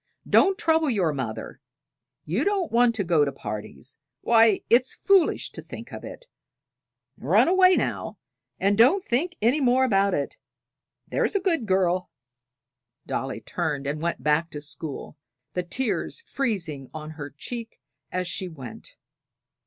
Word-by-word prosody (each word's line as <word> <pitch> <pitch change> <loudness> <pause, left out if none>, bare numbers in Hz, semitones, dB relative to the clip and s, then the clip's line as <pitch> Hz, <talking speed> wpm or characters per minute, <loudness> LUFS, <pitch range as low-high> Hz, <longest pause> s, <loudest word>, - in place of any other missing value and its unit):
"Don't 390 -1 +4
trouble 320 -5 +2
your 185 - +1
mother; 125 -6 -5 0.6
you 185 - 0
don't 395 -3 0
want 235 0 +4
to 205 - 0
go 170 -4 +3
to 140 - 0
parties; 110 +2 -8 0.2
why, 225 -3 +4
it's 245 +2 +3
foolish 390 -4 +2
to - - -7
think - - -10
of - - -7
it. - - -9 0.9
Run - - +4
away 370 +1 +6
now, - - -2 0.4
and 200 +1 +3
don't 265 - +5
think 335 +7 -1
any 255 +7 +3
more 255 0 +4
about 200 -4 +2
it 140 - -3 0.7
there's - - 0
a - - +4
good 335 - 0
girl!" 185 -1 +1 1.0
Dolly - - -3
turned 145 -1 -3
and 145 +2 -3
went 170 +1 -2
back 150 +2 +2
to 150 - -7
school, 145 0 -7 0.4
the 180 - 0
tears 250 - -2
freezing 180 - -3
on 155 0 -6
her 145 -2 -7
cheek 230 - -8 0.3
as 185 -1 -2
she 185 +1 -2
went. 135 -9 -10
195 Hz, 145 wpm, -25 LUFS, -, 1.0 s, away